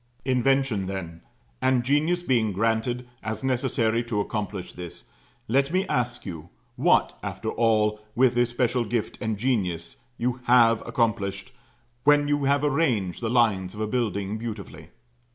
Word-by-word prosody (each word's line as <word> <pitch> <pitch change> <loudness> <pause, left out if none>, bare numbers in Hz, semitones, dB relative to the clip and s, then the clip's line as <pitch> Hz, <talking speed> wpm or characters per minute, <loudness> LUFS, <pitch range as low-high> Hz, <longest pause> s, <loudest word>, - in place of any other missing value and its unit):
Invention, 130 -5 +1
then, 85 -4 -6 0.4
and 130 -2 +2
genius 155 +7 +1
being 115 - +1
granted, 115 +4 0
as 110 +1 -4
necessary 120 -3 +1
to 115 -3 -1
accomplish 100 -2 -3
this, 90 -1 -8 0.4
let 140 +5 +2
me 185 +2 +1
ask 120 -1 -1
you, 85 -4 -7 0.3
What, - - +3
after - - -4
all, 110 -2 +2 0.2
with 130 0 +4
this 120 0 +2
special 120 0 +1
gift 115 0 -3
and 110 -1 -1
genius, 95 -8 -1 0.2
you 125 +1 -1
have 115 -2 +5
accomplished, 110 -2 -1 0.5
when 145 0 +5
you 145 -1 +1
have 140 +1 +2
arranged 130 - +1
the 115 - -1
lines 105 -6 +2
of - - -8
a 110 - 0
building 105 -3 -2
beautifully? 105 -7 -7
115 Hz, 145 wpm, -25 LUFS, 105-130 Hz, 0.5 s, have